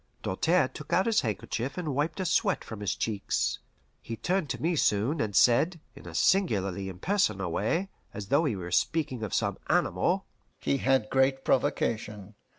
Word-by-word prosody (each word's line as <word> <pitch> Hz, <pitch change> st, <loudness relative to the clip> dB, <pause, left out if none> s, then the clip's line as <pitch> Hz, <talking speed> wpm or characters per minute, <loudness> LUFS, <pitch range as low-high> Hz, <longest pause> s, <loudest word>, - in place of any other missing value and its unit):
Doltaire 160 Hz, -, +2 dB
took 145 Hz, +2 st, -11 dB
out 190 Hz, -, +3 dB
his 225 Hz, -2 st, +3 dB
handkerchief 115 Hz, -, -3 dB
and 160 Hz, -6 st, -2 dB
wiped 150 Hz, +6 st, -1 dB
a 190 Hz, -, -1 dB
sweat 200 Hz, +2 st, +1 dB
from 110 Hz, -, -8 dB
his 105 Hz, 0 st, -1 dB
cheeks. 110 Hz, -3 st, -1 dB, 0.4 s
He 115 Hz, -, -6 dB
turned 180 Hz, -, -1 dB
to -, -, -3 dB
me 170 Hz, +2 st, 0 dB
soon, 120 Hz, +3 st, +1 dB
and 105 Hz, -2 st, -2 dB
said, 155 Hz, -, +4 dB, 0.2 s
in -, -, -12 dB
a -, -, -8 dB
singularly 100 Hz, -, +1 dB
impersonal 100 Hz, -, 0 dB
way, 165 Hz, -, 0 dB, 0.2 s
as 100 Hz, -1 st, -7 dB
though 145 Hz, +4 st, +3 dB
he 130 Hz, -8 st, 0 dB
were 90 Hz, -2 st, -6 dB
speaking 140 Hz, -, 0 dB
of 110 Hz, -4 st, -4 dB
some -, -, -1 dB
animal: -, -, +1 dB, 0.3 s
"He 140 Hz, -, 0 dB
had 130 Hz, -5 st, +1 dB
great 135 Hz, 0 st, +2 dB
provocation. 105 Hz, -5 st, -1 dB
130 Hz, 170 wpm, -28 LUFS, 105-165 Hz, 0.4 s, said